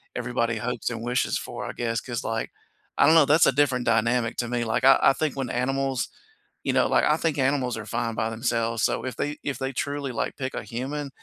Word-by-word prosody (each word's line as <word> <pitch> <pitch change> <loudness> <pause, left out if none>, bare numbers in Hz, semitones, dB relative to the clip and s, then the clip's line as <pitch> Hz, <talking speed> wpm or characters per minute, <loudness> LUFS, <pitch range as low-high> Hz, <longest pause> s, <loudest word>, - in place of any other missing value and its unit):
everybody 120 -1 -1
hopes 125 +1 -2
and 115 -1 -5
wishes 125 +1 0
for, - - -6
I - - -5
guess, 115 -1 -1
'cause, 120 -3 -5
like 115 0 -3 0.5
I - - +5
don't 160 - +6
know, 160 -3 +7
that's 150 +4 +5
a - - +5
different 130 -2 +1
dynamic 115 +1 +1
to 120 - -1
me, 120 0 -1
like, 110 +3 0
I 135 - +8
I - - +6
think 155 -2 -2
when 135 -3 -3
animals 135 +1 -1 0.6
you - - 0
know, - - +3
like - - +3
I - - +4
think 160 -3 -1
animals 135 -2 +1
are 105 - -6
fine 115 +1 -2
by 110 - -1
themselves, 115 0 -1
so - - +1
if 130 - -4
they 145 +1 -3
if 140 -3 -3
they 135 0 -3
truly, 140 +1 -3
like, 115 - -3
pick 130 -1 -4
a - - -3
human, 140 +4 -4
125 Hz, 235 wpm, -25 LUFS, 115-135 Hz, 0.6 s, I